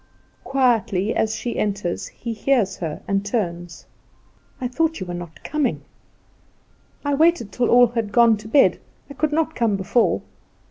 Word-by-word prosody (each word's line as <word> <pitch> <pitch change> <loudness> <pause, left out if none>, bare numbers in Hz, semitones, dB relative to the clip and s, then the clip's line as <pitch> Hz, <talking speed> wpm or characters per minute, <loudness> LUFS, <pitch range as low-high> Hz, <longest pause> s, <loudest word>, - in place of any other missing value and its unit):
Quietly 230 -7 +1
as 220 0 0
she 240 - -4
enters, 200 -4 -2
he 230 -1 -6
hears 220 -4 +1
her, 160 -4 -5
and 195 0 0
turns. 175 -6 -4 0.7
"I 255 - -2
thought 320 +5 -1
you 185 - -4
were 175 - -6
not 175 -2 -8
coming." 300 -2 -1 1.2
"I 285 - +1
waited 315 -6 +2
till 245 -1 0
all 245 +1 +7
had 230 -3 -3
gone 230 +1 +5
to 215 - -11
bed. 275 +5 +4 0.3
I - - -6
could 305 +2 -1
not 320 +1 0
come 230 -7 +1
before." 195 +5 +1
230 Hz, 155 wpm, -22 LUFS, 195-265 Hz, 1.2 s, all